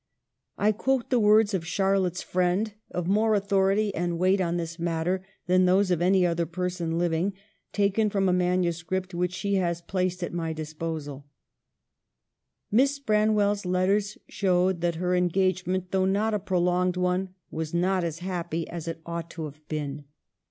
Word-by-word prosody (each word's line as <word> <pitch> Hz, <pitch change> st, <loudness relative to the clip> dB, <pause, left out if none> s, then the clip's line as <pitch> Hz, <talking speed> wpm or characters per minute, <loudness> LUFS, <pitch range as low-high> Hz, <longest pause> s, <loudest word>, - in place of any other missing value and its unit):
I 210 Hz, +1 st, +3 dB
quote 260 Hz, +4 st, -1 dB
the 250 Hz, -, +4 dB
words 210 Hz, 0 st, +5 dB
of 185 Hz, -4 st, 0 dB
Charlotte's 190 Hz, -1 st, +1 dB
friend, 185 Hz, +4 st, 0 dB, 0.2 s
of 180 Hz, -, -3 dB
more 215 Hz, +3 st, +3 dB
authority 200 Hz, +1 st, +2 dB
and 175 Hz, -1 st, -1 dB
weight 185 Hz, +2 st, +3 dB
on 170 Hz, -1 st, 0 dB
this 165 Hz, 0 st, -5 dB
matter 170 Hz, +2 st, -1 dB, 0.2 s
than 185 Hz, +1 st, +4 dB
those 185 Hz, +1 st, +3 dB
of 175 Hz, -2 st, +1 dB
any 185 Hz, +1 st, +4 dB
other 170 Hz, -1 st, 0 dB
person 175 Hz, -1 st, -2 dB
living, 175 Hz, +3 st, 0 dB, 0.4 s
taken 205 Hz, +1 st, +2 dB
from 195 Hz, -2 st, +1 dB
a 180 Hz, -, +3 dB
manuscript 180 Hz, +1 st, 0 dB
which 180 Hz, +1 st, 0 dB
she 200 Hz, +2 st, -1 dB
has 170 Hz, -2 st, 0 dB
placed 180 Hz, +1 st, -2 dB
at 175 Hz, -, -4 dB
my 165 Hz, -2 st, -2 dB
disposal: 155 Hz, -2 st, -5 dB, 0.7 s
" -, -, -56 dB
Miss 270 Hz, +6 st, +3 dB
Branwell's 210 Hz, -4 st, +2 dB
letters 195 Hz, +3 st, +1 dB
showed 185 Hz, -2 st, +1 dB
that 170 Hz, -1 st, 0 dB
her 180 Hz, +2 st, -1 dB
en 180 Hz, 0 st, +2 dB
gagement, 185 Hz, 0 st, 0 dB
though 190 Hz, -1 st, +2 dB
not 205 Hz, +3 st, +1 dB
a 210 Hz, -, +1 dB
prolonged 180 Hz, -1 st, +1 dB
one, 180 Hz, +1 st, -1 dB, 0.2 s
was 160 Hz, -1 st, -4 dB
not 180 Hz, +2 st, +1 dB
as 165 Hz, -2 st, -3 dB
happy 170 Hz, -3 st, -3 dB
as 170 Hz, -1 st, -6 dB
it 165 Hz, 0 st, -5 dB
ought 170 Hz, -1 st, -5 dB
to 165 Hz, -, -6 dB
have 150 Hz, 0 st, -9 dB
been. 150 Hz, -2 st, -4 dB
180 Hz, 165 wpm, -26 LUFS, 170-195 Hz, 0.7 s, words